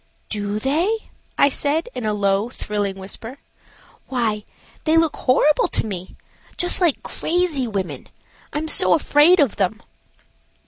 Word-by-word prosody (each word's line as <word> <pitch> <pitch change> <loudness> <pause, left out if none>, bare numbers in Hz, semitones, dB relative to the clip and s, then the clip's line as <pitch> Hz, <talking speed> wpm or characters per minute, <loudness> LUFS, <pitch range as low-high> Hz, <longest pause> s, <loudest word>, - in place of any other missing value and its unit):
"Do 205 -1 -2
they?" 335 - -1 0.3
I 280 - +5
said, 290 - -1
in 230 - -4
a 210 - 0
low, 200 +2 +1
thrilling 205 -5 -3
whisper. 210 +6 -8 0.7
"Why, 220 -5 -1 0.4
they 315 +1 +3
look 325 -2 +2
horrible 290 +3 +3
to - - 0
me; 185 -3 -6 0.4
just 355 +1 +2
like 340 -6 +2
crazy 330 -7 -1
women. 195 -5 -4 0.4
I - - -4
am 315 +1 -2
so - - +5
afraid 315 +3 +5
of 280 -7 +2
them." 200 +2 0
255 Hz, 140 wpm, -21 LUFS, 205-315 Hz, 0.7 s, I